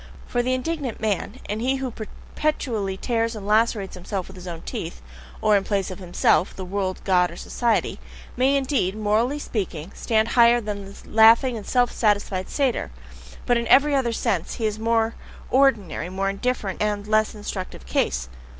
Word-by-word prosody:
For 245 Hz, -, 0 dB
the 255 Hz, +1 st, +1 dB
indignant 270 Hz, -2 st, -3 dB
man, 215 Hz, 0 st, -1 dB
and 210 Hz, +2 st, -3 dB
he 260 Hz, +3 st, +1 dB
who 265 Hz, -2 st, -3 dB
perpetually 220 Hz, -3 st, -3 dB
tears 230 Hz, +1 st, -1 dB
and 205 Hz, -2 st, -7 dB
lacerates 210 Hz, -1 st, +2 dB
himself 185 Hz, +1 st, -4 dB
with 190 Hz, -, -12 dB
his 180 Hz, 0 st, -10 dB
own 165 Hz, -2 st, -6 dB
teeth 65 Hz, -, -5 dB, 0.4 s
(or, 215 Hz, -1 st, +4 dB
in 200 Hz, -, +2 dB
place 195 Hz, -2 st, -1 dB
of 185 Hz, -, -8 dB
himself, 175 Hz, -1 st, +2 dB
the 190 Hz, -, -6 dB
world, 190 Hz, 0 st, -2 dB
God, 180 Hz, -2 st, +3 dB
or 170 Hz, -, -10 dB
society), 235 Hz, -2 st, 0 dB, 0.4 s
may 265 Hz, +3 st, +3 dB
indeed, 265 Hz, -8 st, 0 dB
morally 220 Hz, +6 st, +1 dB
speaking, 190 Hz, -, -4 dB
stand 220 Hz, 0 st, +1 dB
higher 235 Hz, 0 st, +5 dB
than 205 Hz, -3 st, -5 dB
the 195 Hz, -, -12 dB
laughing 225 Hz, +3 st, +5 dB
and 215 Hz, -, -7 dB
self 245 Hz, -1 st, +2 dB
satisfied 205 Hz, -3 st, 0 dB
satyr, 270 Hz, -5 st, 0 dB, 0.6 s
but 245 Hz, -, +3 dB
in 235 Hz, -, -3 dB
every 290 Hz, +2 st, +5 dB
other 265 Hz, -4 st, +2 dB
sense 220 Hz, -7 st, -1 dB
he 225 Hz, -, -2 dB
is 215 Hz, -1 st, -1 dB
the -, -, -7 dB
more 230 Hz, 0 st, +2 dB, 0.4 s
ordinary, 225 Hz, -, +2 dB
more 195 Hz, +1 st, -1 dB
indifferent, 200 Hz, -2 st, -2 dB
and 205 Hz, -1 st, 0 dB
less 215 Hz, +1 st, +2 dB
instructive 190 Hz, -, -6 dB
case. -, -, 0 dB
215 Hz, 180 wpm, -24 LUFS, 195-240 Hz, 0.6 s, higher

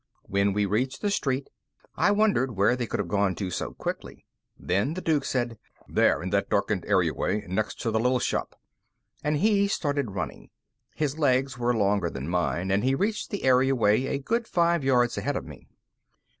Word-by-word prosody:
When 100 Hz, 0 st, +1 dB
we 105 Hz, 0 st, +1 dB
reached 125 Hz, -, -1 dB
the 205 Hz, -, +1 dB
street, 135 Hz, -7 st, -1 dB, 0.4 s
I -, -, +3 dB
wondered 205 Hz, -, +2 dB
where 100 Hz, +5 st, +3 dB
they 120 Hz, -2 st, -3 dB
could -, -, -3 dB
have 100 Hz, -, -1 dB
gone 100 Hz, 0 st, +1 dB
to 95 Hz, -1 st, -4 dB
so -, -, -3 dB
quickly. -, -, -6 dB, 0.3 s
Then 100 Hz, -, -1 dB
the 185 Hz, -, -4 dB
Duke 155 Hz, -5 st, +1 dB
said: 120 Hz, -4 st, -2 dB, 0.3 s
"There! -, -, +2 dB
In -, -, -4 dB
that -, -, 0 dB
darkened -, -, 0 dB
area -, -, +2 dB
way 105 Hz, 0 st, -2 dB
next 100 Hz, +4 st, -2 dB
to 115 Hz, -, -1 dB
the 110 Hz, -, +1 dB
little 125 Hz, +2 st, +2 dB
shop!" 120 Hz, -, -2 dB, 0.6 s
And 150 Hz, +1 st, +1 dB
he 200 Hz, +3 st, +3 dB
started 145 Hz, -, -1 dB
running. -, -, -5 dB, 0.5 s
His 150 Hz, 0 st, -2 dB
legs 135 Hz, -2 st, +1 dB
were 120 Hz, 0 st, +1 dB
longer 100 Hz, -4 st, +1 dB
than 65 Hz, -1 st, -6 dB
mine, 85 Hz, +1 st, -1 dB
and 100 Hz, +3 st, +2 dB
he 135 Hz, +1 st, +2 dB
reached 210 Hz, +8 st, -1 dB
the 205 Hz, -, -4 dB
area 130 Hz, +1 st, +4 dB
way 110 Hz, +2 st, +2 dB
a 140 Hz, -, -1 dB
good 230 Hz, -, -1 dB
five 170 Hz, -2 st, +2 dB
yards 125 Hz, -2 st, +2 dB
ahead -, -, -2 dB
of -, -, -3 dB
me. 60 Hz, 0 st, -12 dB
125 Hz, 195 wpm, -26 LUFS, 100-145 Hz, 0.6 s, area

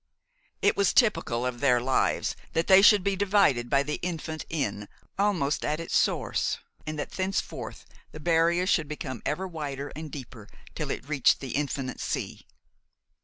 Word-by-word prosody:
It -, -, +4 dB
was 200 Hz, -2 st, +2 dB
typical 125 Hz, -, +2 dB
of 125 Hz, -1 st, -3 dB
their 125 Hz, -3 st, +4 dB
lives 130 Hz, +2 st, +1 dB, 0.2 s
that 165 Hz, -, +1 dB
they 190 Hz, 0 st, +7 dB
should 205 Hz, -1 st, +7 dB
be 200 Hz, 0 st, +1 dB
divided 190 Hz, -12 st, +2 dB
by 140 Hz, 0 st, +3 dB
the 150 Hz, +1 st, -3 dB
infant 160 Hz, -3 st, -4 dB
Inn, 105 Hz, -10 st, -2 dB, 0.3 s
almost 180 Hz, -8 st, +1 dB
at 150 Hz, +1 st, -1 dB
its 165 Hz, -, -3 dB
source, -, -, +1 dB, 0.3 s
and 155 Hz, 0 st, -3 dB
that 145 Hz, -, -4 dB
thenceforth 190 Hz, +1 st, -3 dB, 0.3 s
the 155 Hz, -, -9 dB
barrier 170 Hz, +2 st, +2 dB
should 160 Hz, -5 st, +2 dB
become 135 Hz, -5 st, -6 dB
ever 190 Hz, +1 st, -2 dB
wider 145 Hz, -4 st, -5 dB
and 155 Hz, 0 st, -6 dB
deeper 120 Hz, -6 st, -9 dB, 0.2 s
till -, -, -4 dB
it -, -, -4 dB
reached 145 Hz, -4 st, +3 dB
the 135 Hz, -3 st, -6 dB
infinite 135 Hz, -2 st, -2 dB
sea. -, -, -4 dB
150 Hz, 165 wpm, -27 LUFS, 135-180 Hz, 0.3 s, they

